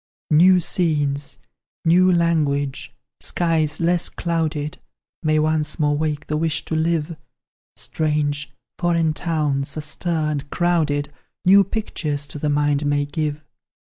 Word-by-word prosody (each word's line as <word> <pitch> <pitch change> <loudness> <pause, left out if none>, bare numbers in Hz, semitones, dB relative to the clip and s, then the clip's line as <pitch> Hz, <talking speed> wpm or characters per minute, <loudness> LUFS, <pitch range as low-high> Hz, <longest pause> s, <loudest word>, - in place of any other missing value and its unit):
"New 180 +4 +6
scenes, 145 -5 0 0.5
new 180 +3 +5
language, 150 -5 0 0.3
skies 160 -3 0
less 170 0 +1
clouded, 155 -3 -2 0.4
May 155 -1 +2
once 155 0 +1
more 145 -2 +2
wake 155 0 -2
the 150 - -2
wish 155 -2 -1
to 160 - -3
live; 165 0 0 0.6
Strange, 150 -1 -1 0.3
foreign 170 -2 +2
towns, 150 -4 -1
astir, 155 +1 -1
and 145 -1 -4
crowded, 155 -5 0 0.3
New 195 +2 +7
pictures 155 -8 -3
to 150 - -7
the 150 - -1
mind 145 0 +1
may 145 0 +1
give. 150 0 -3
155 Hz, 120 wpm, -21 LUFS, 145-170 Hz, 0.6 s, New